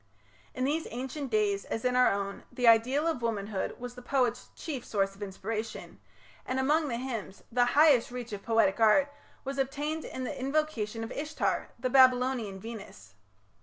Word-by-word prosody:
In 255 - -2
these 300 +4 0
ancient 265 +3 -5
days, 210 -3 +1
as 225 - -4
in 250 0 +2
our 250 0 +5
own, 200 0 -3
the 245 -1 0
ideal 245 +7 +5
of 325 -7 0
womanhood 210 -3 -2
was 245 0 -7
the 250 - -11
poet's 245 -2 0
chief 275 -7 -5
source 195 -2 0
of 195 - -18
inspiration, 215 +3 -5 0.4
and 255 +1 -2
among 300 +4 +2
the 235 -4 -2
hymns 235 -6 -5
the 245 +1 +3
highest 295 -6 +6
reach 245 -2 -6
of 200 - -5
poetic 225 -3 +2
art 275 +6 +4 0.3
was 275 0 -4
attained 290 +4 -2
in 260 - -6
the 290 +3 -4
invocation 255 -6 -1
of 225 - -6
Ishtar, 305 +2 -2
the 255 +1 -2
Babylonian 255 -6 +4
Venus. 225 0 -10
245 Hz, 170 wpm, -29 LUFS, 220-270 Hz, 0.4 s, highest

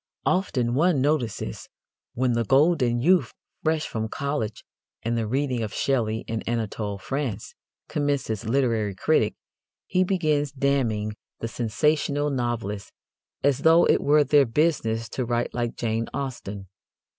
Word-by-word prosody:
Often, 130 -11 +1
one 155 +2 +3
notices, 135 -6 -1 0.5
when 125 0 +1
the 115 0 +1
golden 135 - +3
youth, 180 +3 +3 0.3
fresh 155 -1 +1
from 110 -1 -3
college 140 -4 -3 0.4
and 115 +1 0
the 115 -2 -1
reading 130 0 0
of 110 -2 -4
Shelley 115 -5 0
and 115 0 -3
Anatole 110 -3 -2
France, 120 0 -4 0.3
commences 140 -7 -1
literary 115 -6 +1
critic, - - +2 0.5
he 185 0 +2
begins 155 -6 +1
damning 125 -7 0 0.3
the 115 - -3
sensational 145 +5 0
novelists 115 -6 -3 0.5
as 140 -2 +3
though 165 +1 +6
it - - +3
were 150 +1 +4
their 145 -1 +4
business 115 -4 +1
to 130 - -2
write 120 0 -1
like 120 -1 -2
Jane 115 -1 -1
Austen. 125 -8 -5
125 Hz, 135 wpm, -25 LUFS, 115-145 Hz, 0.5 s, though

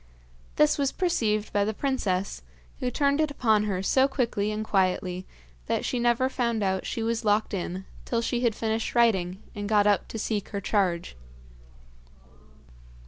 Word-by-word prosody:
This 300 0 +3
was 275 -1 +1
perceived 220 - 0
by 205 - +3
the 215 +1 -2
princess, 200 - -1 0.4
who 250 - -1
turned 280 +3 +2
it 310 - +1
upon 220 -7 +2
her 190 -3 -2
so 265 +6 +4
quickly 235 -6 -1
and 215 0 -3
quietly 185 -2 0 0.4
that - - 0
she 250 - -1
never 240 +2 +2
found 235 -4 -1
out 190 -1 -1
she 225 - -3
was 230 0 -1
locked 210 0 +1
in 185 0 -3 0.2
till 235 -1 -1
she 240 - 0
had 235 -3 +1
finished 225 +1 -2
writing, 190 -5 +2
and 205 0 -5
got 210 -1 +4
up 205 -3 +2
to - - -6
seek 215 -1 -2
her 200 - -3
charge. 185 - 0
215 Hz, 165 wpm, -27 LUFS, 200-240 Hz, 0.4 s, so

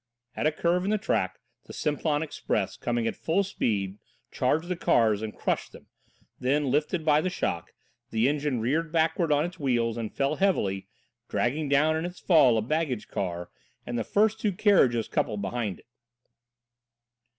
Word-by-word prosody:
At - - +1
a - - +3
curve 175 +3 +1
in 195 - -1
the 215 - +2
track 215 - -1 0.3
the - - -11
Simplon 150 0 0
Express 155 - -2
coming 120 -1 -1
at - - -1
full 180 +5 +1
speed 105 - -2 0.3
charged 155 +7 0
the 180 - -1
cars 110 -10 +2
and 110 -1 -6
crushed - - -2
them, - - -15 0.5
then, 135 +1 +1
lifted 155 +4 0
by 150 -1 +4
the 185 - -1
shock, 85 - -3 0.4
the 115 +2 +2
engine 145 -3 0
reared 155 +8 0
backwards 165 0 +1
on 145 +1 +3
its 175 +1 -7
wheels 120 -5 0
and 115 -2 -4
fell 140 +2 0
heavily, 100 - +1 0.4
dragging 145 +5 0
down 150 +3 +3
in 160 +1 -2
its 175 0 -7
fall 145 -10 +5
a 110 - 0
baggage 140 -3 -2
car 90 -2 -4 0.3
and 120 - -4
the 115 - 0
first 215 - +2
two 210 -2 0
carriages 130 - +3
coupled 105 -2 -1
behind 110 -5 -2
it. - - -33
145 Hz, 175 wpm, -27 LUFS, 115-165 Hz, 0.5 s, fall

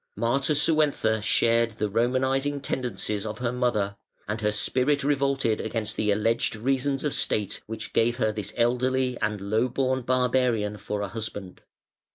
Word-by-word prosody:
Matasuentha 140 -2 +2
shared 115 +2 +2
the 105 0 -1
Romanising 130 +6 +1
tendencies 105 -6 -2
of 105 -1 -5
her 120 -1 -1
mother, 110 -6 0 0.3
and 105 +2 -3
her 105 0 +2
spirit 130 +6 +1
revolted 140 -5 +1
against 110 -1 -3
the 105 - 0
alleged 115 +3 +1
reasons 135 +4 0
of 150 - 0
state 105 -3 0
which 110 0 -6
gave 120 +1 +2
her 110 -3 +1
this 105 -1 -5
elderly 125 +2 +1
and 105 -1 0
low 110 +5 +1
born 130 +1 0
barbarian 125 -4 +1
for 105 +1 -4
a 100 - -2
husband. 100 -2 -6
115 Hz, 150 wpm, -26 LUFS, 105-130 Hz, 0.3 s, Matasuentha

